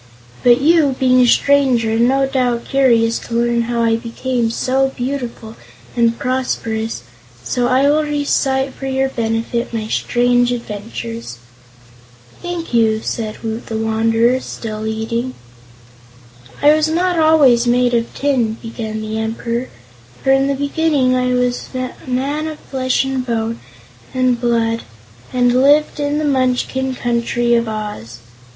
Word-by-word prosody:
But 240 Hz, 0 st, +5 dB
you, 300 Hz, -3 st, +4 dB
being 255 Hz, -1 st, +4 dB
a 245 Hz, -, +4 dB
stranger, 260 Hz, -4 st, +3 dB
are 225 Hz, -, 0 dB
no 265 Hz, +3 st, +3 dB
doubt 250 Hz, -3 st, -1 dB
curious 235 Hz, -4 st, +2 dB
to 235 Hz, -, -7 dB
learn 235 Hz, 0 st, +1 dB
how 235 Hz, 0 st, -1 dB
I 225 Hz, 0 st, +2 dB
became 235 Hz, 0 st, -2 dB
so 265 Hz, +3 st, +1 dB
beautiful 245 Hz, -4 st, -5 dB, 0.4 s
and 235 Hz, -1 st, +2 dB
prosperous, 225 Hz, -, -2 dB, 0.4 s
so 245 Hz, -, 0 dB
I 260 Hz, +3 st, +3 dB
will 300 Hz, +2 st, +3 dB
recite 275 Hz, -3 st, 0 dB
for 270 Hz, -, -7 dB
your 265 Hz, 0 st, 0 dB
benefit 230 Hz, 0 st, -2 dB
my 220 Hz, -2 st, -3 dB
strange 245 Hz, +2 st, +1 dB
adventures." 230 Hz, -, -6 dB, 1.0 s
"Thank 350 Hz, -5 st, -5 dB
you," 220 Hz, -2 st, +2 dB
said 220 Hz, -1 st, -4 dB
Woot 225 Hz, +1 st, -4 dB
the 220 Hz, -, -3 dB
Wanderer, 225 Hz, +3 st, +2 dB
still 220 Hz, -3 st, -6 dB
eating. 230 Hz, +3 st, -3 dB, 1.3 s
"I 295 Hz, +1 st, +7 dB
was 310 Hz, 0 st, +2 dB
not 350 Hz, +2 st, 0 dB
always 285 Hz, -7 st, +5 dB
made 245 Hz, 0 st, +2 dB
of 235 Hz, -1 st, 0 dB
tin," 250 Hz, -6 st, 0 dB
began 220 Hz, -2 st, -5 dB
the 215 Hz, 0 st, -3 dB
Emperor, 230 Hz, +2 st, -3 dB, 0.5 s
"for 270 Hz, -, +3 dB
in 270 Hz, 0 st, +3 dB
the 280 Hz, -, 0 dB
beginning 285 Hz, -2 st, +1 dB
I 250 Hz, 0 st, +1 dB
was 250 Hz, 0 st, -1 dB
a 255 Hz, 0 st, -3 dB, 0.2 s
man 280 Hz, +5 st, -1 dB
of 310 Hz, -1 st, -6 dB
flesh 260 Hz, -2 st, -1 dB
and 265 Hz, -1 st, -2 dB
bone 230 Hz, -2 st, -2 dB, 0.6 s
and 255 Hz, -2 st, +1 dB
blood 230 Hz, -1 st, +1 dB, 0.5 s
and 245 Hz, -1 st, +2 dB
lived 295 Hz, +2 st, +3 dB
in 290 Hz, 0 st, 0 dB
the 305 Hz, -, -1 dB
Munchkin 260 Hz, -1 st, 0 dB
Country 240 Hz, 0 st, 0 dB
of 235 Hz, -1 st, +2 dB
Oz. 210 Hz, -, -6 dB
245 Hz, 145 wpm, -17 LUFS, 230-270 Hz, 1.3 s, I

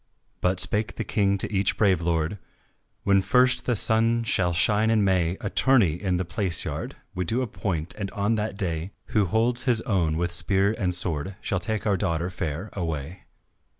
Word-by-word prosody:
But 90 Hz, 0 st, +1 dB
spake 105 Hz, +3 st, 0 dB
the -, -, -3 dB
King 100 Hz, -2 st, +1 dB
to 100 Hz, -, -3 dB
each 95 Hz, -1 st, +1 dB
brave 95 Hz, -5 st, +3 dB
lord, 85 Hz, +3 st, -1 dB, 0.6 s
"When 100 Hz, -1 st, +4 dB
first 125 Hz, +4 st, +3 dB
the 120 Hz, -, +2 dB
sun 115 Hz, +2 st, +2 dB
shall 90 Hz, -5 st, +2 dB
shine 105 Hz, +6 st, +3 dB
in 110 Hz, -2 st, +3 dB
May 95 Hz, -2 st, +1 dB
A -, -, -2 dB
tourney 120 Hz, -, +4 dB
in 95 Hz, -3 st, 0 dB
the 90 Hz, -, -2 dB
palace 95 Hz, -2 st, -2 dB
yard -, -, -5 dB, 0.2 s
We 90 Hz, -, -2 dB
do 115 Hz, +9 st, -1 dB
appoint, 90 Hz, -7 st, -3 dB
and 100 Hz, -1 st, -3 dB
on 100 Hz, +3 st, 0 dB
that 105 Hz, -2 st, -2 dB
day 85 Hz, -2 st, -3 dB, 0.2 s
Who 105 Hz, -2 st, +3 dB
holds 115 Hz, +7 st, 0 dB
his 120 Hz, -4 st, +2 dB
own 85 Hz, -9 st, 0 dB
with 85 Hz, +1 st, -1 dB
spear 95 Hz, +3 st, +1 dB
and 90 Hz, -4 st, -1 dB
sword 85 Hz, +1 st, -2 dB
Shall 100 Hz, -, -2 dB
take 110 Hz, +4 st, -3 dB
our 100 Hz, -2 st, +2 dB
daughter 85 Hz, -1 st, -1 dB
fair 85 Hz, +3 st, -4 dB
away." 80 Hz, -2 st, -5 dB
95 Hz, 185 wpm, -25 LUFS, 85-110 Hz, 0.6 s, When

